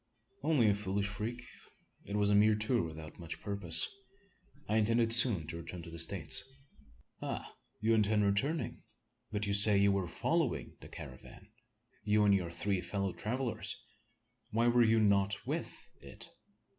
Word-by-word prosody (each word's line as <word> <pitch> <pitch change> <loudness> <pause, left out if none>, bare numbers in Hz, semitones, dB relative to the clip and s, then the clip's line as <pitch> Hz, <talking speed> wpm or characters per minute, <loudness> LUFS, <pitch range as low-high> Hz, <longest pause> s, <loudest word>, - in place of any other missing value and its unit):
"Only 140 -9 +3
a 105 - +4
foolish 100 0 -2
freak. 110 +4 -5 0.6
It 100 - -5
was 105 0 +2
a - - +4
mere 105 +1 +5
tour 110 +3 +1
without 80 0 -8
much 85 -1 -6
purpose. 95 -6 +3 0.8
I 110 - +1
intended 115 +1 +4
soon 115 -8 +4
to 85 +2 -6
return 85 +1 -8
to 85 - -10
the 85 - -7
States." 80 -2 +1 0.8
"Ah! - - -5 0.3
you 110 +1 +2
intend 105 -1 +2
returning? 135 +12 -1 0.5
But 105 -1 -1
you 100 - -1
say 100 0 +5
you 100 0 +4
were 100 -2 -1
following 160 - -1
the - - -12
caravan 65 -1 -11 0.5
you 105 0 +3
and 100 - +5
your 90 -3 0
three 90 +3 -1
fellow 95 +1 -3
travellers! 120 +1 -3 0.7
Why 115 +2 +1
were 120 0 +4
you 115 -1 +4
not 100 -1 +3
with - - -4 0.2
it? - - -5
105 Hz, 155 wpm, -33 LUFS, 95-110 Hz, 0.8 s, mere